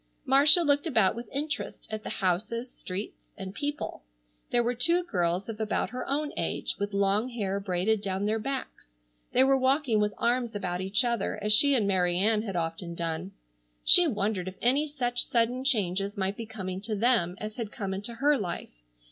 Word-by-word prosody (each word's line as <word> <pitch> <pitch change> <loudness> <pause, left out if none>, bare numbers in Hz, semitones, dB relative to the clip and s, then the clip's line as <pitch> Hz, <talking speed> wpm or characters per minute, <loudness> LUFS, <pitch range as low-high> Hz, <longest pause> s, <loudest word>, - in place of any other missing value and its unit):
Marcia 285 +6 +6
looked 285 +1 +2
about 220 -10 +3
with 235 -1 -8
interest 300 +3 -4
at 215 0 -4
the - - -6
houses, 220 +6 -2
streets, 190 +3 -7
and 190 -1 -7
people. 290 +4 -4 0.5
There 240 - +3
were 240 +1 0
two 335 +9 +3
girls 180 - -1
of 220 -1 -6
about 220 0 -1
her 250 +1 -5
own 295 +2 -1
age - - -2
with 200 0 -2
long 200 +4 +2
hair 200 -5 -2
braided 200 +2 0
down 195 0 -2
their 220 +1 0
backs. 270 - -5 0.4
They 255 - +5
were 270 0 +4
walking 265 -3 +2
with 210 0 0
arms 240 -1 0
about 180 -3 -3
each 195 +6 +2
other 235 -4 -1
as 210 0 +3
she 280 +6 +5
and 215 -5 +1
Mary 180 -2 +2
Ann 210 +3 +2
had 200 -4 -5
often 170 +1 -3
done. 170 +2 -4 0.5
She 355 -1 +8
wondered 205 - -1
if 190 - -6
any 275 +5 +2
such 245 -4 -1
sudden 240 +2 +1
changes 200 -5 0
might 195 +1 -1
be 225 0 -7
coming 190 -4 -5
to 215 +1 -3
them 205 -6 +2
as 215 0 -7
had 225 -4 -4
come 195 -2 -4
into 205 +5 -5
her 285 +3 +2
life. 175 -4 -5
215 Hz, 190 wpm, -28 LUFS, 195-255 Hz, 0.5 s, She